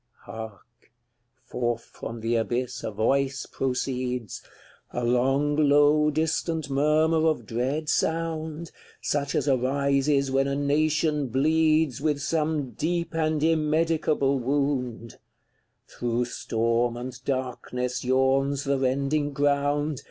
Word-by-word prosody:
CLXVII. - - -10
Hark! 110 +1 -11 0.5
forth 120 -1 -2
from 115 0 -8
the 115 +1 0
abyss 120 +2 -2
a - - -2
voice 135 +6 0
proceeds, 125 -3 -3 0.5
A 125 - -3
long, 135 +4 +2
low 150 +1 +4
distant 160 0 -1
murmur 155 +3 +3
of 150 -8 0
dread 130 +8 -2
sound, 160 0 -1 0.3
Such 140 -1 -1
as 145 - 0
arises 140 +1 +1
when 135 +1 +2
a 140 - -1
nation 150 0 +1
bleeds 155 +1 +2
With 150 -1 0
some 150 -2 -1
deep 170 +1 -2
and 155 -2 0
immedicable 155 -3 +1
wound; 125 -3 -2 0.7
Through 120 0 -2
storm 115 0 -1
and 125 +1 -6
darkness 125 -1 -3
yawns 135 +2 +2
the 140 -1 0
rending 140 +3 0
ground. 145 0 +1
140 Hz, 115 wpm, -26 LUFS, 125-150 Hz, 0.7 s, low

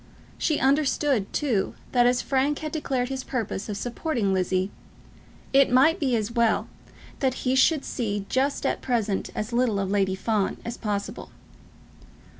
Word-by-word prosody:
She 305 - +1
understood, 275 -5 +1
too, 230 -10 0 0.2
that 245 -1 +4
as 245 0 +2
Frank 275 +2 +1
had 310 -1 -5
declared 265 -5 -1
his 265 -1 -4
purpose 220 -5 -3
of 205 - -3
supporting 240 -3 -1
Lizzie, 185 +1 0 0.8
it 275 -1 +5
might 315 +8 +5
be 265 -5 +1
as 215 0 -1
well 235 -2 +2 0.5
that 265 -2 -1
he 255 - +2
should 275 +3 +3
see 205 -5 -2
just 275 +2 0
at - - 0
present 220 -6 -1
as 215 +3 -3
little 235 -4 +2
of 195 -1 -2
Lady 195 -2 +1
Fawn 205 0 0
as 235 - -4
possible. 205 -3 -4
245 Hz, 155 wpm, -25 LUFS, 205-270 Hz, 0.8 s, it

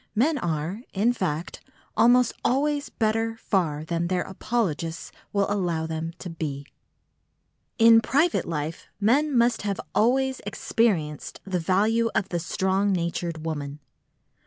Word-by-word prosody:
Men 285 +7 +2
are, 170 +3 -2
in 220 +5 +2
fact, 170 -6 -3 0.3
almost 245 +2 +5
always 285 +2 +1
better 225 0 0
far 160 -9 -1
than 170 +1 -1
their 180 0 0
apologists 180 -6 -2 0.2
will 200 -1 +2
allow 175 -6 -1
them 160 +1 -4
to - - -8
be. 150 -4 -5 1.1
In 230 -1 +7
private 300 +9 +1
life 160 0 -4
men 265 +6 +3
must 235 0 +3
have 200 -1 -2
always 265 +3 +2
experienced 195 -7 -1
the 190 -2 -1
value 215 +7 +2
of 195 - 0
the 175 - -1
strong 190 +4 0
natured 170 -2 -2
woman. 145 -2 -4
195 Hz, 130 wpm, -25 LUFS, 165-230 Hz, 1.1 s, In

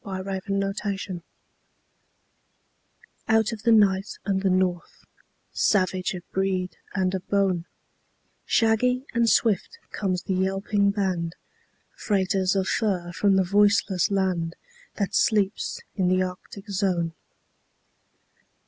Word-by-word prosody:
THE 190 -2 -5 0.2
TRAIN 195 0 -1
DOGS 195 0 -3 2.2
Out 220 0 +3
of 225 -2 -6
the 230 +1 +3
night 200 -2 +3
and 195 -2 0
the 195 - +2
north; 185 -2 -1 0.5
Savage 185 -2 +1
of 175 - -7
breed 190 -1 -1 0.2
and 185 -1 +1
of 185 -1 -5
bone, 190 -4 +1 0.8
Shaggy 250 +3 +2
and 235 -1 +3
swift 215 -6 +1
comes 185 -3 -2
the 190 - -2
yelping 195 +2 +1
band, 185 -5 -1 0.6
Freighters 190 -2 0
of 190 -1 0
fur 185 -6 0
from 200 +2 +2
the 190 - +4
voiceless 200 -1 +3
land 185 -4 0 0.4
That 200 -2 -2
sleeps 205 -2 +1 0.2
in 185 -3 +1
the 185 +1 +3
Arctic 185 +3 -8
zone. 180 -4 0
195 Hz, 115 wpm, -25 LUFS, 185-205 Hz, 2.2 s, the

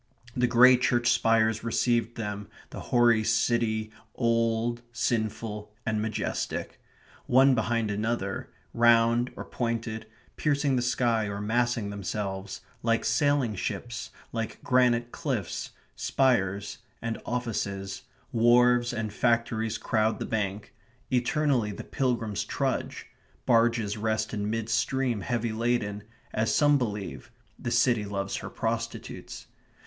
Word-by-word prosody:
The 125 0 +2
grey 125 +1 +7
church 120 -1 +2
spires 110 -1 +2
received 120 +1 +1
them; 105 -2 -4 0.2
the - - -7
hoary 120 -2 +4
city, 110 -1 +1 0.2
old, 115 0 +1
sinful, 110 -3 -2
and 110 -1 0
majestic. 110 -1 -3 0.5
One 135 +2 +6
behind 115 -2 0
another, 105 -2 -2 0.2
round 115 +1 +4
or - - -7
pointed, 115 -2 -3 0.3
piercing 145 -2 +1
the 125 - +1
sky 120 -3 +1
or 100 0 -4
massing 115 0 0
themselves, 100 -1 -4 0.2
like 115 0 +1
sailing 145 -6 +2
ships, 120 +5 -4 0.2
like 115 -2 -4
granite 120 -2 +3
cliffs, 130 - -3 0.3
spires 105 -6 +1 0.2
and 115 -1 -4
offices, 100 -5 -3 0.3
wharves 120 +1 +4
and 110 -3 -3
factories 115 -1 +1
crowd 110 -2 +1
the - - -4
bank; 100 -2 -3 0.4
eternally 125 -2 +1
the 100 - -7
pilgrims 115 -6 -1
trudge; - - -2 0.4
barges 115 -3 +2
rest 110 +1 -1
in 105 -1 -2
mid 115 0 -2
stream 120 0 0
heavy 120 -1 -1
laden; 110 -2 -1 0.3
as 110 0 +1
some 145 -1 +4
believe, 105 -5 -4 0.3
the - - -3
city 120 -2 +3
loves 100 -1 -3
her - - -6
prostitutes. - - -4
115 Hz, 120 wpm, -28 LUFS, 110-120 Hz, 0.5 s, grey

